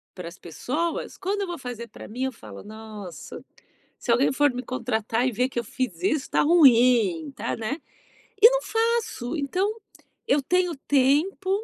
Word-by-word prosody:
para 175 Hz, -2 st, -7 dB
as 180 Hz, -, -15 dB
pessoas, 290 Hz, -, -3 dB
quando 400 Hz, +2 st, -2 dB
eu 390 Hz, -, -2 dB
vou 345 Hz, -1 st, -5 dB
fazer 240 Hz, -2 st, -7 dB
pra -, -, -11 dB
mim, 245 Hz, +4 st, -5 dB
eu 265 Hz, -, -1 dB
falo: 105 Hz, -, -11 dB
"Nossa, 215 Hz, -4 st, -9 dB, 0.6 s
se 240 Hz, -, -4 dB
alguém 250 Hz, +4 st, +3 dB
for 290 Hz, -1 st, +3 dB
me 250 Hz, +1 st, -4 dB
contratar 230 Hz, -1 st, -1 dB
e -, -, -2 dB
ver 250 Hz, +4 st, +1 dB
que 245 Hz, -, -5 dB
eu 235 Hz, -, -1 dB
fiz 215 Hz, -7 st, -4 dB
isso, 300 Hz, -3 st, 0 dB
tá -, -, +3 dB
ruim, 240 Hz, -, +5 dB
tá", 225 Hz, -, -3 dB
né, 230 Hz, +8 st, -3 dB, 0.6 s
e 455 Hz, -, +11 dB
não -, -, 0 dB
faço. 450 Hz, -, -1 dB
Então, 370 Hz, +10 st, -1 dB, 0.5 s
eu 280 Hz, +1 st, +3 dB
tenho 360 Hz, +1 st, +1 dB
tempo, 290 Hz, +8 st, +2 dB
255 Hz, 175 wpm, -25 LUFS, 220-335 Hz, 0.6 s, e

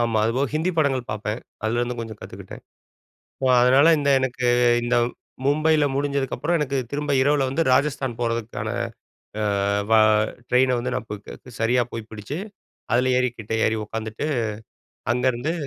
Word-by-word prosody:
ஆமா. 115 Hz, -2 st, +1 dB
அதுபோல 130 Hz, +5 st, +1 dB
ஹிந்தி 165 Hz, +4 st, +1 dB
படங்கள் 135 Hz, -5 st, +1 dB
பார்ப்பேன். 105 Hz, +2 st, -4 dB, 0.2 s
அதுலேருந்து 120 Hz, +2 st, -1 dB
கொஞ்சம் 110 Hz, -2 st, -7 dB
கத்துக்கிட்டேன். -, -, -10 dB, 0.8 s
அ -, -, +4 dB, 0.2 s
அதனால, 135 Hz, +5 st, +6 dB
இந்த 140 Hz, 0 st, +1 dB
எனக்கு 125 Hz, -1 st, -2 dB, 0.4 s
இந்த 120 Hz, +1 st, +1 dB, 0.5 s
மும்பையில 155 Hz, +1 st, +3 dB
முடிஞ்சதுக்கப்பறம் 140 Hz, +3 st, 0 dB
எனக்கு 140 Hz, -2 st, -1 dB
திரும்ப 145 Hz, 0 st, -2 dB
இரவுல 140 Hz, -1 st, +2 dB
வந்து 160 Hz, +5 st, 0 dB
ராஜஸ்தான் 135 Hz, -3 st, 0 dB
போறதுக்கான 115 Hz, -1 st, -2 dB, 0.7 s
அ -, -, 0 dB, 0.5 s
வ -, -, +5 dB, 0.5 s
ட்ரெயின 125 Hz, 0 st, +3 dB
வந்து 120 Hz, -, -2 dB
நான் 115 Hz, -, -6 dB
போ -, -, -2 dB, 0.5 s
சரியா 120 Hz, +2 st, +2 dB
போய் 115 Hz, -1 st, -6 dB
பிடிச்சு, 110 Hz, +9 st, -6 dB, 0.5 s
அதில 125 Hz, +2 st, +3 dB
ஏறிக்கிட்டே 115 Hz, -3 st, -2 dB
ஏறி 110 Hz, 0 st, +1 dB
உட்காந்துட்டு 110 Hz, +5 st, -5 dB, 0.9 s
அங்கேருந்து 125 Hz, +4 st, 0 dB
125 Hz, 135 wpm, -23 LUFS, 115-140 Hz, 0.9 s, அதனால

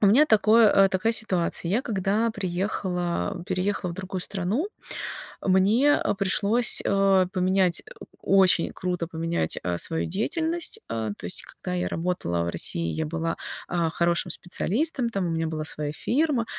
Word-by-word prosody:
у 205 Hz, -, +4 dB
меня 270 Hz, +10 st, +6 dB
такое, 220 Hz, 0 st, +5 dB
э 195 Hz, -1 st, +5 dB
такая 210 Hz, +4 st, 0 dB
ситуация. 185 Hz, -6 st, 0 dB
Я 240 Hz, +6 st, +1 dB
когда 210 Hz, +2 st, 0 dB
приехала 180 Hz, -, -2 dB
переехала 185 Hz, 0 st, -1 dB
в 170 Hz, -, -6 dB
другую 190 Hz, -1 st, -5 dB
страну, 205 Hz, -, -2 dB, 0.7 s
мне 205 Hz, +10 st, +3 dB, 0.2 s
пришлось, 210 Hz, +4 st, +4 dB
э 195 Hz, -1 st, +3 dB
поменять, 185 Hz, -1 st, +2 dB, 0.4 s
очень 190 Hz, -3 st, +3 dB
круто 180 Hz, -2 st, -3 dB
поменять, 165 Hz, -, -2 dB
э 90 Hz, -1 st, -1 dB
свою 160 Hz, -, 0 dB
деятельность. 320 Hz, -, -1 dB
Э 110 Hz, -1 st, -3 dB
то -, -, -15 dB
есть, 90 Hz, -, -2 dB
когда -, -, -7 dB
я 90 Hz, 0 st, -1 dB
работала 160 Hz, -, -2 dB
в 85 Hz, -, -2 dB
России, 85 Hz, -1 st, 0 dB
я 160 Hz, -1 st, -2 dB
была, 165 Hz, +1 st, -3 dB, 0.3 s
а 170 Hz, -2 st, 0 dB
хорошим 170 Hz, +1 st, 0 dB
специалистом, 240 Hz, -, -1 dB
там 195 Hz, -4 st, -2 dB
у 170 Hz, -, -2 dB
меня 165 Hz, 0 st, -1 dB
была 155 Hz, -1 st, -4 dB
своя 150 Hz, -1 st, -2 dB
фирма, 265 Hz, -, 0 dB
185 Hz, 150 wpm, -25 LUFS, 165-215 Hz, 0.7 s, меня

